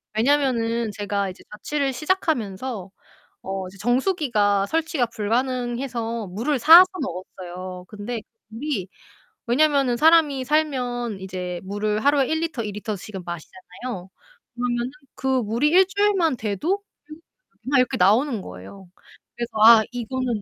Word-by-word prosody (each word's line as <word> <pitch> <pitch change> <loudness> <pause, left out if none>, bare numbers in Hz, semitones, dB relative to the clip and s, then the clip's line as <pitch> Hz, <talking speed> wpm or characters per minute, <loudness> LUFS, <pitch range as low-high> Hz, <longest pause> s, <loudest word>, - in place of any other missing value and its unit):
왜냐면은 235 -3 +1
제가 200 -1 -2
이제 185 - -15
자취를 275 +6 -2
시작하면서 245 - -2 0.5
어 190 0 -4
이제 190 - -14
정수기가 240 - +1
설치가 320 -1 0
불가능해서 235 0 -2
물을 235 +10 -1
사서 330 +9 +9 0.2
먹었어요. 185 -4 -7
근데 215 +2 -6 0.3
물이 225 -4 -4 0.6
왜냐면은 275 -1 +2
사람이 305 -3 +4
살면 250 -7 -1
이제 180 -2 -5
물을 210 +2 -2
하루에 285 -1 +4
1L 320 -6 -2
2L씩은 210 -1 -5
마시잖아요. 185 +4 -8 0.5
그러면은 240 0 -2 0.2
그 265 - -4 0.2
물이 235 +8 +1
일주일만 380 -3 +3
돼도 290 - -1 0.9
막 280 - +3
이렇게 255 - +1
나오는 220 +5 +3
거예요. 95 - -11 0.5
그래서 240 0 -4
아 225 -1 +9
이거는 245 -1 -3
235 Hz, 290 characters per minute, -23 LUFS, 205-280 Hz, 0.9 s, 사서